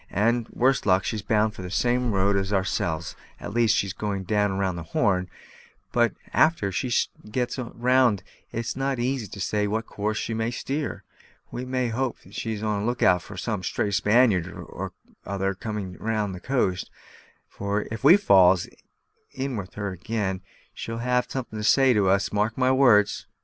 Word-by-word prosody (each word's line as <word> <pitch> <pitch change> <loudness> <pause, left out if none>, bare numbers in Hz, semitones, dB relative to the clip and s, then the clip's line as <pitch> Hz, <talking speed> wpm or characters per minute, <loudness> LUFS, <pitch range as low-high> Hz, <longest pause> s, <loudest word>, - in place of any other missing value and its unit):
And, 115 +3 +1
worst 130 -2 +1
luck, 95 0 +4
she's 110 -2 -2
bound 105 0 +1
the 90 -1 -7
same 125 +5 +1
road 100 0 +2
as 95 0 -1
ourselves 90 -4 -1 0.2
at 100 - -7
least, 115 -2 +3
she's 100 -2 0
going 100 -2 -3
round 100 -2 0
the 85 - -5 0.2
Horn; 90 -2 +2 0.6
but 120 -1 +2 0.2
a'ter 155 -12 +3
she 125 +6 -2 0.4
gets 125 +3 -2
round 120 -3 +2 0.3
it's 115 0 -3
not 135 0 -1
so - - -2
easy 125 -3 -1
to 100 - -10
say 105 +2 0
what 110 +2 -1
course 105 +1 -3
she 115 - -2
may 110 +1 -1
steer. 140 +4 -4 0.5
We 125 - -5
must 130 -2 -1
hope 130 0 -1
she's 110 -2 -4
on 105 -1 0
the 100 - -2
look 120 0 -1
out 90 -1 +5
for - - -11
some - - -2
stray 105 - -1
Spaniard 105 -1 +3
or - - -7 0.3
other 95 0 -1
coming 100 -1 -5
down 105 0 -2
the 90 - -7
coast; 95 -7 -1 0.6
for 100 +1 -3
if 110 - -5
we 165 +8 +8
falls 95 - +5 0.7
in 135 -1 -3
with 95 -3 -6
her 100 -1 -3
ag'in, 95 0 -3 0.3
she'll 115 0 -5
have 125 +1 0
some'at 130 -2 -4
to 110 -1 -5
say 130 +5 +5
to 100 -4 +3
us, 100 +2 +1
mark 105 +2 0
my 130 0 +3
words." 120 -6 +4
105 Hz, 175 wpm, -25 LUFS, 100-120 Hz, 0.7 s, we